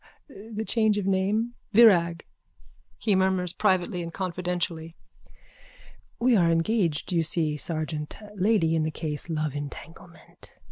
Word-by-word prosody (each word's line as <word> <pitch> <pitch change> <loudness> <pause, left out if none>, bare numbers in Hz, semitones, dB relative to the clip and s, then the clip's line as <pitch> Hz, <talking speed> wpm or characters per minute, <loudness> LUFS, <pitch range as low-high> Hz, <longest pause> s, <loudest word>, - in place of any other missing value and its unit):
The 220 -4 -7
change 220 -2 +2
of 205 - -2
name. 200 +5 0 0.2
Virag. 175 -7 +5 0.7
(He 210 - +1
murmurs 190 -2 +1
privately 185 -3 +1
and 170 0 -6
confidentially.) 175 -2 -3 1.2
We 245 0 +3
are 175 -5 +4
engaged 165 -1 0
you 170 -2 +2
see, 160 -1 0
sergeant. 155 -1 -4 0.2
Lady 195 -4 +2
in 160 - +1
the 155 - 0
case. 155 +1 -5
Love 155 -3 -2
entanglement. 155 +4 -10
175 Hz, 125 wpm, -26 LUFS, 165-205 Hz, 1.2 s, Virag